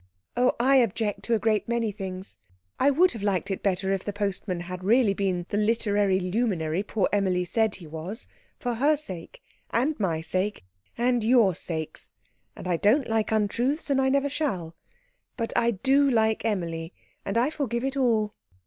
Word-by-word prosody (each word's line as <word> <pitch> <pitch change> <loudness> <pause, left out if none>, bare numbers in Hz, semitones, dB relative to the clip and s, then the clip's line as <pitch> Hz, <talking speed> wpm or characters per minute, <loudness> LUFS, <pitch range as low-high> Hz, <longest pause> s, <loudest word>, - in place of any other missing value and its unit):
"Oh, 250 +1 +3
I 270 +3 +5
object 220 -3 +1
to 235 - +2
a - - +3
great 215 0 +1
many 235 -2 0
things. 190 - -7 0.4
I 275 - +5
would 345 +6 +4
have 225 - -7
liked 195 -1 0
it 190 - -3
better 195 0 0
if 195 - -2
the 205 - -3
postman 200 -3 -2
had 180 +1 -7
really 220 +1 +4
been 185 -3 -1
the 205 - -1
literary 205 -3 +2
luminary 180 -4 0
poor 205 -1 0
Emilie 185 -3 +1
said 220 +3 +1
he 180 - -11
was 165 - -6 0.3
for 245 -1 -2
her 290 +6 +3
sake, 285 - -9 0.3
and 270 +5 0
my 170 -6 0
sake, 185 - -2 0.3
and 245 -1 +2
your 225 -4 +5
sakes. 160 -1 -5 0.4
And - - -8
I 175 -2 +1
don't 235 - +3
like 225 -1 0
untruths, 240 +8 0
and 270 - +3
never 280 +1 +2
shall. 190 - -2 0.6
But 230 -2 -2
I 235 - +3
do 270 +6 +3
like 220 -3 +2
Emilie, 170 -5 -2 0.3
and 200 - -2
I 250 +6 +2
forgive 240 -6 -2
it 270 +1 -1
all." 225 -6 +1
210 Hz, 175 wpm, -26 LUFS, 185-240 Hz, 0.6 s, I